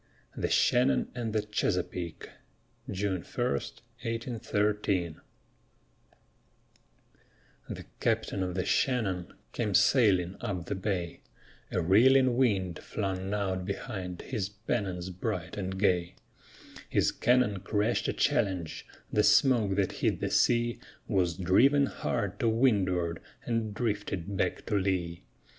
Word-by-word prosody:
THE -, -, -1 dB
SHANNON 125 Hz, +2 st, +3 dB
AND 120 Hz, -3 st, -3 dB
THE 105 Hz, -1 st, 0 dB
CHESAPEAKE 90 Hz, -5 st, -2 dB, 0.6 s
[June 95 Hz, -2 st, -1 dB
1, -, -, -3 dB
1813] 105 Hz, -, -2 dB, 2.5 s
The -, -, -6 dB
captain 110 Hz, -4 st, 0 dB
of 90 Hz, -1 st, -2 dB
the 90 Hz, -, -1 dB
Shannon 100 Hz, -9 st, 0 dB, 0.2 s
came 105 Hz, -5 st, -1 dB
sailing 95 Hz, -3 st, +4 dB
up 95 Hz, -7 st, -3 dB
the -, -, -3 dB
bay, 95 Hz, -3 st, -3 dB, 0.5 s
A 90 Hz, -, 0 dB
reeling 125 Hz, +7 st, +5 dB
wind 95 Hz, -9 st, +1 dB
flung 95 Hz, -2 st, -3 dB
out 95 Hz, -3 st, -1 dB
behind 90 Hz, -1 st, -5 dB
his 100 Hz, -3 st, -3 dB
pennons 100 Hz, -4 st, -3 dB
bright 90 Hz, -1 st, -4 dB
and 95 Hz, -1 st, -4 dB
gay; 90 Hz, -3 st, +1 dB, 0.7 s
His -, -, +2 dB
cannon 120 Hz, -5 st, +2 dB
crashed 105 Hz, +4 st, 0 dB
a -, -, 0 dB
challenge; 90 Hz, -5 st, 0 dB, 0.3 s
the 105 Hz, -, +4 dB
smoke 105 Hz, -2 st, +4 dB
that 95 Hz, -2 st, +1 dB
hid -, -, 0 dB
the -, -, -2 dB
sea 120 Hz, 0 st, +2 dB, 0.3 s
Was 90 Hz, -6 st, +1 dB
driven 130 Hz, +11 st, +4 dB
hard 110 Hz, -6 st, -3 dB
to 115 Hz, -, +2 dB
windward 95 Hz, -8 st, +1 dB, 0.2 s
and 115 Hz, -2 st, -1 dB
drifted 100 Hz, -4 st, -2 dB
back 90 Hz, -1 st, -1 dB
to 105 Hz, -, -1 dB
lee. 90 Hz, -3 st, -1 dB
100 Hz, 115 wpm, -29 LUFS, 90-115 Hz, 2.5 s, reeling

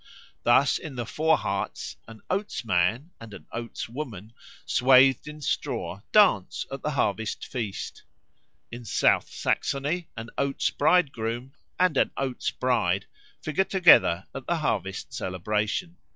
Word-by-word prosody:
Thus 130 Hz, +4 st, +4 dB
in 150 Hz, -4 st, -8 dB
the 120 Hz, -1 st, -3 dB
Vorharz 115 Hz, -10 st, -1 dB
an 115 Hz, -1 st, -12 dB
Oats 200 Hz, -, -2 dB
man 110 Hz, -, +1 dB
and 115 Hz, -3 st, -9 dB
an -, -, -12 dB
Oats 115 Hz, 0 st, -5 dB
woman, 115 Hz, -5 st, -7 dB, 0.3 s
swathed 130 Hz, +1 st, +5 dB
in 150 Hz, 0 st, -9 dB
straw, 95 Hz, -7 st, -3 dB
dance 190 Hz, -, +4 dB
at 135 Hz, -1 st, -5 dB
the 150 Hz, -, -2 dB
harvest 110 Hz, -6 st, -1 dB
feast. 110 Hz, -6 st, -5 dB, 0.7 s
In 120 Hz, +1 st, -8 dB
South 110 Hz, -, +2 dB
Saxony 150 Hz, +6 st, -1 dB
an 115 Hz, 0 st, -7 dB
Oats 140 Hz, 0 st, 0 dB
bridegroom 135 Hz, -6 st, +1 dB, 0.3 s
and 180 Hz, -6 st, +3 dB
an -, -, +3 dB
Oats 135 Hz, -2 st, -2 dB
bride 105 Hz, -7 st, 0 dB, 0.4 s
figure 155 Hz, +5 st, +1 dB
together 170 Hz, -, +5 dB
at 135 Hz, -, -8 dB
the 170 Hz, -, +1 dB
harvest 100 Hz, -, -2 dB
celebration. 105 Hz, -, -2 dB
125 Hz, 130 wpm, -26 LUFS, 110-150 Hz, 0.7 s, swathed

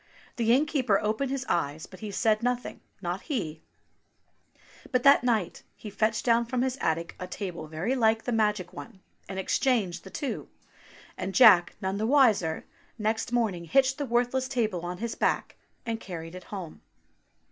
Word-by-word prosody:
The 230 Hz, -1 st, +2 dB
innkeeper 260 Hz, -6 st, +3 dB
opened 215 Hz, +6 st, -1 dB
his 270 Hz, -1 st, -3 dB
eyes, 155 Hz, -2 st, -1 dB
but 185 Hz, -, -14 dB
he 215 Hz, -, -6 dB
said 215 Hz, +2 st, +1 dB
nothing, 245 Hz, +1 st, -2 dB, 0.2 s
not -, -, -2 dB
he! 165 Hz, -, -4 dB, 1.3 s
But 250 Hz, -2 st, +1 dB
that 275 Hz, -3 st, +7 dB
night 225 Hz, -7 st, 0 dB
he 210 Hz, -, -9 dB
fetched 215 Hz, +2 st, 0 dB
down 235 Hz, -1 st, +3 dB
from 250 Hz, 0 st, 0 dB
his 260 Hz, -1 st, -1 dB
attic 165 Hz, +1 st, -1 dB
a 180 Hz, -, -5 dB
table 180 Hz, -3 st, -6 dB
very 160 Hz, +11 st, -2 dB
like 225 Hz, -2 st, +2 dB
the 245 Hz, -, -2 dB
magic 210 Hz, -5 st, 0 dB
one, 145 Hz, +6 st, -10 dB, 0.3 s
and 190 Hz, -, -5 dB
exchanged 200 Hz, -1 st, 0 dB
the 190 Hz, -, -10 dB
two, 280 Hz, +6 st, -4 dB, 0.7 s
and 190 Hz, +1 st, -4 dB
Jack, 200 Hz, -9 st, +7 dB
none 190 Hz, +1 st, -1 dB
the 220 Hz, -, 0 dB
wiser, 225 Hz, -, +3 dB, 0.3 s
next 220 Hz, +1 st, -1 dB
morn 235 Hz, -4 st, +2 dB
ing 170 Hz, -1 st, -8 dB
hitched 265 Hz, -, +2 dB
the 285 Hz, -, -2 dB
worthless 245 Hz, +2 st, +1 dB
table 220 Hz, -9 st, -1 dB
on 180 Hz, 0 st, -4 dB
to -, -, -13 dB
his 235 Hz, -1 st, -2 dB
back -, -, 0 dB, 0.3 s
and 225 Hz, -1 st, -2 dB
carried 165 Hz, -4 st, -7 dB
it 185 Hz, 0 st, -9 dB
home. 185 Hz, -6 st, -8 dB
220 Hz, 175 wpm, -28 LUFS, 185-245 Hz, 1.3 s, that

